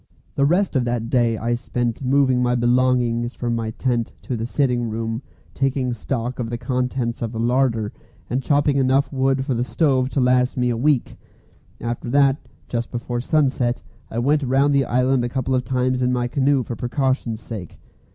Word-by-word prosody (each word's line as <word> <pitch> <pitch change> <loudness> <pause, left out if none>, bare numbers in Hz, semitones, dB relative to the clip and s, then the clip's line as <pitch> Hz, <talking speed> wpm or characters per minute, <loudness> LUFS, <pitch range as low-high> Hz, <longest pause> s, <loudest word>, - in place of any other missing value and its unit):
The 140 0 +2
rest 180 +2 +1
of 130 - +3
that 120 -1 -2
day 120 -3 +2
I 115 +2 -1
spent 120 0 -2
moving 130 -1 +3
my 125 0 +2
belongings 120 -1 +1
from 120 -1 -2
my 115 -1 -2
tent 120 0 -1
to 125 - -3
the 115 0 -3
sitting 125 -3 0
room, 115 +1 -3 0.3
taking 135 -2 0
stock 120 +2 -3
of 115 -2 -2
the 120 - -3
contents 125 -1 -2
of 115 -2 -2
the 115 - -4
larder, 120 -3 +1 0.3
and 130 +2 -1
chopping 145 +1 +2
enough 135 +1 +2
wood 135 0 +1
for 135 - 0
the 120 0 0
stove 130 -2 +1
to 140 - -1
last 125 0 +2
me 125 0 +2
for - - +1
a - - -3
week. 145 -3 +1 0.6
After 120 +1 -4
that, 140 +1 +4 0.3
just 120 -1 -3
before 120 0 -3
sunset, 130 -4 +1 0.3
I 110 - -6
went 145 +5 +2
round 135 +2 +2
the 140 -1 +3
island 125 +1 +2
a 120 - -1
couple 130 +1 -1
of 130 -1 +1
times 125 +1 0
in 125 0 +2
my 125 -1 0
canoe 135 +1 +2
for 120 - -5
precaution's 125 -2 -1
sake. 100 -7 -8
125 Hz, 190 wpm, -22 LUFS, 120-135 Hz, 0.6 s, that